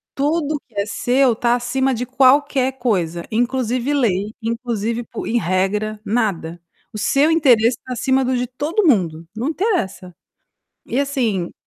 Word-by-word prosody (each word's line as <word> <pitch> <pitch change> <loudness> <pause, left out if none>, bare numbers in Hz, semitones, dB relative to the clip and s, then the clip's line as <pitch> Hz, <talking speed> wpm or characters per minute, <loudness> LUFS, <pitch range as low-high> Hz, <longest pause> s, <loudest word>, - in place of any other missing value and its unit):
Tudo 300 +2 0
o - - -4
que 235 - -30
é - - -2
seu 245 +3 +2
tá 235 +1 +1
acima 260 +2 0
de 245 +1 -3
qualquer 265 +1 +3
coisa, 175 -8 -1
inclusive 245 +3 0
lei, 210 -6 0
inclusive 230 0 -2
po - - -7
em 240 - +1
regra, 205 +3 -1
nada. 200 -7 -1 0.3
O 215 - -7
seu 275 +8 +2
interesse 250 -8 +4
tá 255 - -4
acima 265 +2 +1
do 255 +1 0
de 250 0 -1
todo 295 - -1
mundo, 170 - +1
não 240 +6 -2
interessa. 250 - -2 0.7
E 245 - -2
assim 235 -11 -1
240 Hz, 155 wpm, -20 LUFS, 210-265 Hz, 0.7 s, interesse